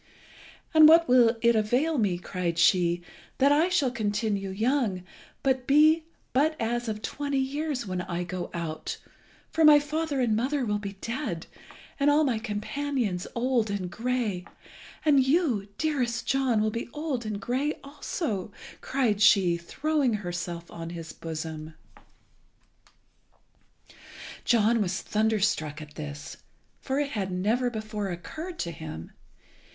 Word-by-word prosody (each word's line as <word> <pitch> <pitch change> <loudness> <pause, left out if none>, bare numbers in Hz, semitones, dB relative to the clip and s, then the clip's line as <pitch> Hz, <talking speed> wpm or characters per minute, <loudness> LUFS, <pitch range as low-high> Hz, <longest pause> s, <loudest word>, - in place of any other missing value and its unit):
"And 310 -1 +9
what 330 +1 +7
will 240 -2 +5
it 235 0 +5
avail 250 +8 +1
me," 195 -5 +1
cried 175 -2 -3
she, 175 0 +3 0.3
"that 275 +2 +4
I 315 +5 +4
shall 290 -8 +2
continue 205 -3 -1
young, 215 -2 0 0.4
and 260 -2 +1
be 310 +3 +5 0.3
but 310 +4 +2
as 240 +1 -1
of 215 0 -4
twenty 285 -1 -2
years 275 -1 -2
when 185 -2 -3
I 175 0 -3
go 180 +1 -5
out, 165 -2 -4 0.5
for 325 - +2
my 300 -1 +9
father 300 0 -2
and 235 -4 +2
mother 260 +4 0
will 210 -1 0
be 200 -1 -6
dead, 230 - -3 0.5
and 280 +1 +4
all 295 +2 +4
my 250 -6 +1
companions 220 -2 -2
old 240 -2 +1
and 190 -3 -3
grey; 230 -6 -2 0.6
and 280 -3 +5
you, 265 - +1
dearest 250 -7 -1
John, 260 -5 +2
will 215 0 +1
be 230 +2 -4
old 295 -5 -3
and 215 -2 -4
grey 260 +8 -1
also," 275 - -4 0.3
cried 235 -7 0
she, 195 -5 +5
throwing 275 - 0
herself 175 -3 -5
on 165 0 -7
his 165 -2 -7
bosom. 160 -1 -6 2.7
John 230 -1 +3
was 190 -2 -1
thunderstruck 210 -8 0
at 150 -1 -10
this, 150 0 -7 0.4
for 270 +1 -2
it 285 -1 -1
had 195 -4 -2
never 220 +7 +1
before 215 -3 -4
occurred 315 - -6
to 170 - -3
him. 155 - -8
225 Hz, 140 wpm, -27 LUFS, 185-275 Hz, 2.7 s, And